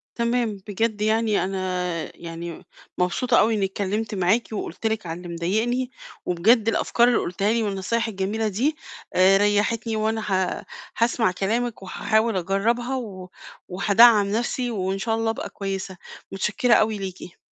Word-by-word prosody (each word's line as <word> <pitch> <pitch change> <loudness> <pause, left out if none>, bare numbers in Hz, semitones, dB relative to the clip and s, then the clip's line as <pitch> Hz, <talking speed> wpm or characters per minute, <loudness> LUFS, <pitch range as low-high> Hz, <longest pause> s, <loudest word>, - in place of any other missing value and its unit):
تمام. 235 -2 0
بجد 210 +1 -1
يعني 220 -1 +2
أنا 180 -3 -3
يعني 170 0 -7 0.3
مبسوطة 235 +8 +2
أو 225 - +3
إنّي 210 -3 +1
اتكلِّمت 205 +3 -3
معاكِ، 195 +5 +1
وقُلت 215 +1 -4
لِك 220 -4 -1
على 165 0 -4
اللي 175 0 -9
مضايقني، 230 +9 0 0.4
وبجد 215 +6 +3
الأفكار 235 +2 +3
اللي 245 - +3
قُلتيها 195 +5 0
لي 230 -1 +1
والنصايح 210 +3 -1
الجميلة 210 +2 -1
دي 265 +10 0 0.4
آآ، 190 +1 +6
ريّحتني 210 +2 +1
وأنا 220 +1 0
ه 185 -1 0 0.3
هاسمع 230 -4 +2
كلامِك 225 +3 -2
وهاحاول 220 +3 0
أجرّبها، 230 +8 0
و 190 -7 -7 0.4
وهادعَّم 205 +3 +5
نَفْسي 240 +2 -1
وإن 190 -2 -2
شاء 225 +2 -1
الله 225 0 0
أبقى 225 - -4
كويسة، 195 -1 -5 0.4
مُتشكِّرة 210 +5 +2
أوي 215 -1 +2
ليكِ. 185 -2 -7
210 Hz, 145 wpm, -24 LUFS, 190-230 Hz, 0.4 s, آآ